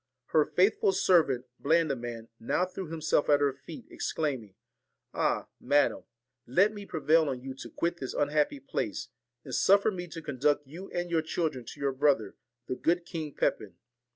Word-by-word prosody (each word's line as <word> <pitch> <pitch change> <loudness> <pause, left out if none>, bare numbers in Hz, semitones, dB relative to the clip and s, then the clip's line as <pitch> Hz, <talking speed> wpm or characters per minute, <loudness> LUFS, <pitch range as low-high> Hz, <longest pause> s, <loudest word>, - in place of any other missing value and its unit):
Her 155 -2 +4
faithful 195 +1 +3
servant, 160 -10 +3
Blandiman, 130 -8 0
now 150 +10 +1
threw 185 0 -7
him 165 -1 -5
self 155 -1 +2
at 145 -1 +6
her 140 -1 +2
feet, 135 +4 -11
exclaiming, 130 -11 -3 0.6
'Ah! - - 0
madam, 145 0 +2 0.4
let 190 - +3
me 205 -1 -8
prevail 155 0 +3
on 130 -2 -3
you 135 0 -5
to 135 - -9
quit 170 +1 -2
this 130 -5 -5
unhappy 150 - +1
place, 275 - -3 0.3
and - - -9
suffer 200 +2 +4
me 180 -2 -5
to 165 - -7
conduct 145 +1 +1
you 170 +8 -9
and 175 0 -3
your 165 -1 +3
children 155 -5 -2
to 145 - -10
your 140 -1 +1
brother, 135 -7 +2 0.3
the - - -3
good 170 +5 +1
King 160 -5 -5
Pepin. - - -1
155 Hz, 170 wpm, -29 LUFS, 135-175 Hz, 0.6 s, at